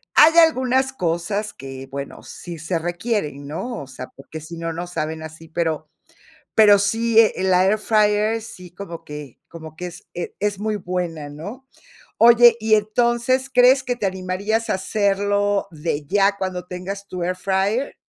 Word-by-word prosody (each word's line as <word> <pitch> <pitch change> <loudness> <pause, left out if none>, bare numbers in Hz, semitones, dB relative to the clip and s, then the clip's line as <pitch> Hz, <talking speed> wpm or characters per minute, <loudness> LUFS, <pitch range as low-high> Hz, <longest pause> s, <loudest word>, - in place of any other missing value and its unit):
Hay 325 +2 +7
algunas 265 -5 +4
cosas 200 +2 -2
que, 135 0 -9
bueno, 140 +1 -7
sí 170 -2 -9
se 170 +2 -2
requieren, 175 - -3
¿no? 225 - -5
O - - -12
sea, 130 -1 -8
porque 150 +3 -10
si 165 +2 -9
no, 165 0 -3
no 170 +2 -4
saben 160 -2 -4
así, 160 +1 -10
pero 160 -2 -2 0.7
pero 210 -2 +7
sí, 225 +3 +1
eh, 225 -2 +6
la 185 0 +4
air 205 +3 +3
fryer 215 +1 +2
sí 180 -5 -11
como 170 -3 -8
que 150 -4 -9
como 160 -2 -11
que 180 - -5
es 175 0 -11
e 175 - -5
es 205 -1 -1
muy 215 +1 -1
buena, 175 -5 -4
¿no? 200 - -9 0.5
Oye, 235 0 +7
y 220 0 +3
entonces, 240 +5 +1
¿crees 250 +2 +6
que 250 - -1
te 210 - -1
animarías 190 +4 -2
a - - +2
hacerlo 200 +1 0
de 155 -2 -4
ya 200 +4 +2
cuando 185 -2 -4
tengas 195 +3 -6
tu 180 -1 -5
air 180 +1 -1
fryer? 195 +7 -1
190 Hz, 170 wpm, -21 LUFS, 165-220 Hz, 0.7 s, Hay